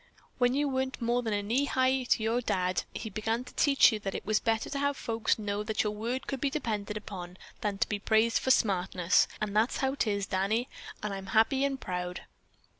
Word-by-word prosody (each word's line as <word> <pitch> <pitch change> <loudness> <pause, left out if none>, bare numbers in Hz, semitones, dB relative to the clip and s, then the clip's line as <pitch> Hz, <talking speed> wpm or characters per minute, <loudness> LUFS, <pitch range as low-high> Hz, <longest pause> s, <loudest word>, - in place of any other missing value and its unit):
When 245 0 +3
you 290 +1 +1
weren't 260 -1 -2
more 240 0 +1
than 205 -3 -1
knee 260 +6 +2
high 260 -1 +1
to 225 - +2
your 230 +2 +1
Dad, 185 -5 0
he 230 - -6
began 225 +4 -1
to - - -13
teach 275 -3 +5
you 215 - -2
that 195 -2 -4
it - - -5
was 215 0 +2
better 225 -1 0
to 280 - -3
have 285 0 0
folks 225 -1 0
know 205 -1 -2
that 215 0 -1
your 210 - 0
word 235 +5 -3
could 270 -2 -4
be 280 - +2
depended 215 -7 -3
on 180 -1 -7 0.2
than 205 -2 -2
to - - +1
be 210 - -2
praised 220 +2 +3
for - - -2
smartness, 190 -3 +3
and 210 -1 -3
that's 220 +3 +2
how 265 0 0
'tis, 205 -7 0
Danny, 200 +7 0 0.4
and 210 -1 -2
I'm 195 0 -6
happy 245 +5 +4
and 275 -1 0
proud." 180 -2 -4
220 Hz, 215 wpm, -30 LUFS, 205-260 Hz, 0.4 s, teach